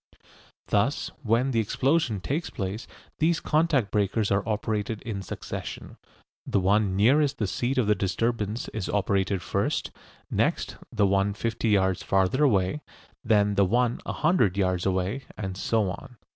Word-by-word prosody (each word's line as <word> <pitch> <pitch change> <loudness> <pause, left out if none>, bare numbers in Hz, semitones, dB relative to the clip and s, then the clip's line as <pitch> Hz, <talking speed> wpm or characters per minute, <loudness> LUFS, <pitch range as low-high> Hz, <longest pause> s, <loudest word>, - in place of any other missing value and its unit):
Thus 105 +8 +1
when 120 +2 +1
the 115 - +1
explosion 125 - +1
takes 150 - -2
place 100 +4 -5 0.3
these 160 +1 +2
contact 150 -9 +1
breakers 105 +1 +1
are 100 +1 +3
operated 105 0 -2
in 110 -5 -4
succession. 95 - -7 0.5
The - - 0
one 100 +1 +2
nearest 140 +7 +3
the 105 - 0
seat 120 +7 -2
of 125 - +3
the 105 - +4
disturbance 105 +3 -1
is 105 -3 -4
operated 100 -2 0
first; - - -1 0.4
next - - 0 0.2
the 105 - +2
one 100 +1 +1
fifty 115 +1 -1
yards 95 -3 +2
farther 95 +9 +2
away; 105 +1 +2 0.4
then 105 -2 +3
the 100 0 +3
one 120 +4 +1
a - - -4
hundred 135 - +2
yards 95 -2 +1
away, 95 +8 -1
and 95 -3 -4
so 105 0 0
on. 125 +5 -10
105 Hz, 150 wpm, -26 LUFS, 100-125 Hz, 0.5 s, the